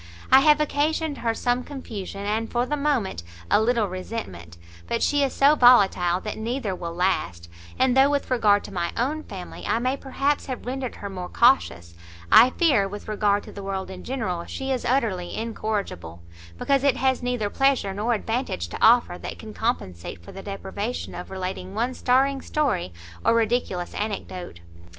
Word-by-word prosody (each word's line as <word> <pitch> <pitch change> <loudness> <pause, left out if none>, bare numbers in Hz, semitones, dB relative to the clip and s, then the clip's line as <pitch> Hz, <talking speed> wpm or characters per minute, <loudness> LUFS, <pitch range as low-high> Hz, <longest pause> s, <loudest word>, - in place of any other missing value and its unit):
I 265 - +9
have 300 +2 +5
occasioned 300 0 0
her 230 -1 0
some 245 +1 0
confusion, 205 -8 -7
and, 220 +2 -1
for 240 0 +1
the 295 - -1
moment, 280 - -1 0.3
a - - +5
little 230 -2 +2
resentment; 180 - -7 0.3
but - - -1
she 290 0 +2
is 275 -2 +1
so 280 +2 +5
volatile 200 - +5
that 215 - -5
neither 230 -2 -2
will 170 -2 -6
last; 90 - -1 0.3
and 260 -1 +3
though, 270 +1 +6
with 285 -2 -1
regard 210 -5 +3
to 205 - -10
my 170 -2 -1
own 285 +6 0
family, 190 -10 -9
I - - +2
may 255 +3 0
perhaps 275 +1 -1
have 255 -2 -5
rendered 255 0 -4
her 200 - -7
more 180 -2 -6
cautious, 160 - +2 0.4
I 250 - +9
fear, 255 - +2
with 205 +1 -8
regard 205 -1 +1
to - - -11
the 200 - -8
world 195 -1 -4
in 185 -1 -9
general, 190 -10 -3
she 270 0 -4
is 255 -2 -1
utterly 225 -9 0
incorrigible, 205 - -4 0.3
because 275 -1 +1
it 280 -2 +3
has 260 -1 +1
neither 245 -4 -1
pleasure 270 -8 +2
nor 220 +4 0
advantage 225 - -3
to - - -7
offer, 225 -6 +5
that - - -7
can 215 -1 -10
compensate 90 - -3
for - - -10
the 195 - -9
deprivation 200 +4 -5
of 180 - -7
relating 185 0 -5
one 240 +4 0
staring 265 +2 +2
story, 250 - -1 0.3
or - - +4
ridiculous 225 -6 0
anecdote." 185 - -5
225 Hz, 180 wpm, -24 LUFS, 190-260 Hz, 0.4 s, I